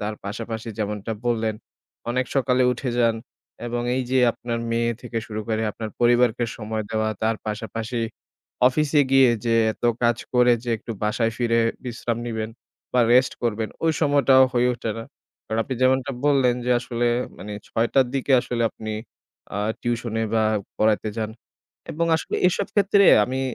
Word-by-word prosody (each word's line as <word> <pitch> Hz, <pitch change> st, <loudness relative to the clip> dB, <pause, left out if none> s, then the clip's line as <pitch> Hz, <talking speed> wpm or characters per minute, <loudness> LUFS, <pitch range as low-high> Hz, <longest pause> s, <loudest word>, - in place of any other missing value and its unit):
তার 105 Hz, +1 st, -3 dB
পাশাপাশি 110 Hz, +2 st, -5 dB
যেমনটা 105 Hz, +1 st, -3 dB
বললেন, 110 Hz, -2 st, 0 dB, 0.6 s
অনেক 130 Hz, 0 st, 0 dB
সকালে 130 Hz, -1 st, +2 dB
উঠে 125 Hz, +1 st, -3 dB
যান 115 Hz, -1 st, +3 dB, 0.5 s
এবং 120 Hz, 0 st, -2 dB
এই 130 Hz, -, 0 dB
যে 130 Hz, -, +3 dB
আপনার 120 Hz, -1 st, -4 dB
মেয়ে 115 Hz, 0 st, +1 dB
থেকে 115 Hz, -1 st, -3 dB
শুরু 110 Hz, -1 st, -4 dB
করে 110 Hz, 0 st, 0 dB
আপনার 110 Hz, -1 st, -6 dB
পরিবারকে 120 Hz, 0 st, +3 dB
সময় 110 Hz, -1 st, -4 dB
দেওয়া, 110 Hz, 0 st, 0 dB
তার 110 Hz, 0 st, +1 dB
পাশাপাশি 110 Hz, +3 st, -4 dB, 0.7 s
অফিসে 150 Hz, +2 st, +2 dB
গিয়ে 135 Hz, -2 st, +6 dB
যে 115 Hz, -1 st, +2 dB, 0.2 s
এত -, -, -11 dB, 0.2 s
কাজ 120 Hz, 0 st, +3 dB, 0.2 s
করে 125 Hz, 0 st, +5 dB
যে, 120 Hz, -, -2 dB
একটু 115 Hz, +1 st, -7 dB
বাসায় 115 Hz, +2 st, +1 dB
ফিরে 115 Hz, -1 st, +2 dB, 0.2 s
বিশ্রাম 120 Hz, -1 st, -3 dB
নিবেন 110 Hz, -1 st, -3 dB, 0.4 s
বা 125 Hz, -, +4 dB
রেস্ট 130 Hz, +1 st, +4 dB
করবেন, 110 Hz, -2 st, -1 dB, 0.2 s
ওই 160 Hz, -, +3 dB
সময়টাও 140 Hz, -3 st, +5 dB
হয়ে 125 Hz, 0 st, +3 dB
ওঠে 115 Hz, -1 st, -4 dB
না। 115 Hz, -, -6 dB, 0.4 s
কারণ 110 Hz, -, -2 dB
আপনি 130 Hz, -, -4 dB
যেমনটা 130 Hz, +1 st, +2 dB
বললেন 135 Hz, -4 st, +4 dB
যে 125 Hz, -, 0 dB
আসলে 120 Hz, -1 st, -2 dB, 0.3 s
মানে 105 Hz, -, -7 dB, 0.2 s
৬:০০ 115 Hz, +4 st, +2 dB
র -, -, -7 dB
দিকে 135 Hz, 0 st, 0 dB
আসলে 120 Hz, -1 st, -2 dB
আপনি 110 Hz, 0 st, -6 dB, 0.6 s
আ -, -, -1 dB, 0.2 s
টিউশনে 115 Hz, -2 st, -2 dB
বা 110 Hz, -, +3 dB, 0.3 s
পড়াইতে 110 Hz, 0 st, +2 dB
যান 110 Hz, -1 st, -2 dB, 0.6 s
এবং 165 Hz, +2 st, 0 dB
আসলে -, -, -3 dB
এসব 195 Hz, +2 st, -1 dB
ক্ষেত্রে 200 Hz, 0 st, +4 dB, 0.2 s
আমি 130 Hz, +1 st, -3 dB
120 Hz, 165 wpm, -23 LUFS, 110-125 Hz, 0.7 s, গিয়ে